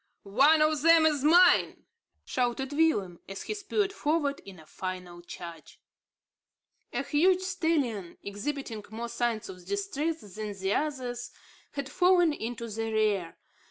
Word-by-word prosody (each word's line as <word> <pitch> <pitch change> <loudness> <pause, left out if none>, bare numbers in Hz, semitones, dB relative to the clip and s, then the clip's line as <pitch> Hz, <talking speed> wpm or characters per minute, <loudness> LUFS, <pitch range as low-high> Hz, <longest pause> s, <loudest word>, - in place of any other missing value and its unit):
"One 280 +10 +5
of 310 -2 +1
them 330 0 +6
is 295 -3 +2
mine," 345 +5 +5 0.4
shouted 255 +2 -1
Willem, 210 - +1
as 195 - -6
he - - -3
spurred 410 -1 -1
forward 295 -5 0
in 195 -2 -11
a 160 - -15
final 180 0 -6
charge. 170 -2 -10 1.1
A - - -2
huge 360 +5 +3
stallion, 315 - -1
exhibiting 220 +2 -4
more 230 +2 -5
signs 235 -2 -1
of 180 -1 -10
distress 330 -5 -2
than 210 +1 -6
the 190 +1 0
others, 250 -5 -2 0.4
had 280 -1 -4
fallen 355 +1 +4
into 235 -2 -5
the 225 +1 -3
rear. 210 -6 0
260 Hz, 135 wpm, -29 LUFS, 205-320 Hz, 1.1 s, them